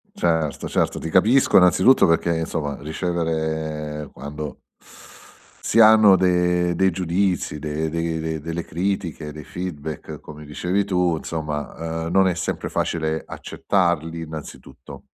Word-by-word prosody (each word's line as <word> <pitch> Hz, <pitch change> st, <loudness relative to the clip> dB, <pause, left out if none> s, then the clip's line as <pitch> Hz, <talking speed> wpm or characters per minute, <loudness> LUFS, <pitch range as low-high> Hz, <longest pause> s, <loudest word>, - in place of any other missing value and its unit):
Certo, 80 Hz, -3 st, 0 dB
certo, -, -, 0 dB
ti 80 Hz, -, -5 dB
capisco 110 Hz, +10 st, +4 dB
innanzitutto 95 Hz, +8 st, +6 dB
perché 85 Hz, 0 st, +2 dB
insomma 80 Hz, -3 st, -3 dB
ricevere 80 Hz, -2 st, -3 dB
quando 75 Hz, +2 st, -7 dB, 1.0 s
si 115 Hz, -, +2 dB
hanno 110 Hz, -3 st, +8 dB
de 90 Hz, -1 st, +2 dB
dei 95 Hz, +3 st, +3 dB
giudizi, 90 Hz, -2 st, -1 dB
de 75 Hz, +1 st, -2 dB
de 80 Hz, -1 st, -2 dB
delle 80 Hz, +2 st, -4 dB
critiche, 85 Hz, -4 st, -3 dB
dei 75 Hz, 0 st, -9 dB
feedback 80 Hz, -4 st, -6 dB
come 75 Hz, 0 st, -11 dB
dicevi 90 Hz, +7 st, -1 dB
tu, 90 Hz, -3 st, +1 dB
insomma, 80 Hz, +1 st, -4 dB
uhm, -, -, -4 dB
non 95 Hz, +1 st, +4 dB
è 90 Hz, -, +2 dB
sempre 85 Hz, -, -3 dB
facile 80 Hz, -1 st, -1 dB
accettarli 85 Hz, -3 st, -1 dB
innanzitutto 75 Hz, -3 st, -10 dB
80 Hz, 125 wpm, -22 LUFS, 75-90 Hz, 1.0 s, hanno